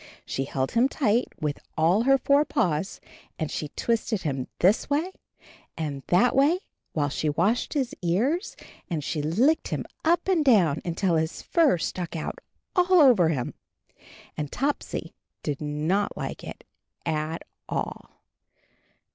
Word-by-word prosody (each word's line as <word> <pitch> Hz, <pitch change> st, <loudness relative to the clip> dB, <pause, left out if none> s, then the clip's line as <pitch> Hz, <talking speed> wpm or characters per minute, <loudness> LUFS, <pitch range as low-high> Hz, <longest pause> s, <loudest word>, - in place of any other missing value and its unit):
She 135 Hz, -, -2 dB
held 135 Hz, -1 st, -2 dB
him 240 Hz, +3 st, +3 dB
tight 245 Hz, -4 st, +1 dB
with 150 Hz, -2 st, -2 dB, 0.2 s
all 170 Hz, +6 st, +4 dB
her 270 Hz, 0 st, +6 dB
four 280 Hz, +2 st, +4 dB
paws, 190 Hz, -, -1 dB, 0.4 s
and 155 Hz, -, -3 dB
she 150 Hz, -, -3 dB
twisted 220 Hz, +4 st, -1 dB
him 135 Hz, -5 st, -2 dB
this 195 Hz, +9 st, +3 dB
way 310 Hz, +6 st, 0 dB, 0.7 s
and 145 Hz, -4 st, -3 dB
that 195 Hz, +8 st, +4 dB
way, 300 Hz, +7 st, +4 dB, 0.3 s
while 145 Hz, -2 st, 0 dB
she 150 Hz, +2 st, -1 dB
washed 195 Hz, -, +1 dB
his 270 Hz, -1 st, 0 dB
ears, 230 Hz, -, 0 dB, 0.3 s
and 160 Hz, -4 st, -2 dB
she 150 Hz, -, -2 dB
licked 230 Hz, -, +2 dB
him -, -, -3 dB, 0.2 s
up 345 Hz, +2 st, +2 dB
and 360 Hz, -5 st, +3 dB
down 185 Hz, -, +4 dB
until 170 Hz, 0 st, +1 dB
his 160 Hz, +1 st, -2 dB
fur 325 Hz, -, +3 dB
stuck 175 Hz, +1 st, -4 dB
out 160 Hz, -, -4 dB, 0.4 s
all 365 Hz, 0 st, +3 dB
over 235 Hz, -, +6 dB
him. 130 Hz, -6 st, -2 dB, 0.8 s
And 150 Hz, -2 st, -4 dB
Topsy 280 Hz, +2 st, -2 dB, 0.3 s
did 145 Hz, -2 st, -3 dB
not 155 Hz, +7 st, -1 dB
like -, -, -5 dB
it -, -, -9 dB, 0.4 s
at 160 Hz, 0 st, -2 dB, 0.3 s
all. -, -, -4 dB
180 Hz, 145 wpm, -26 LUFS, -, 0.8 s, her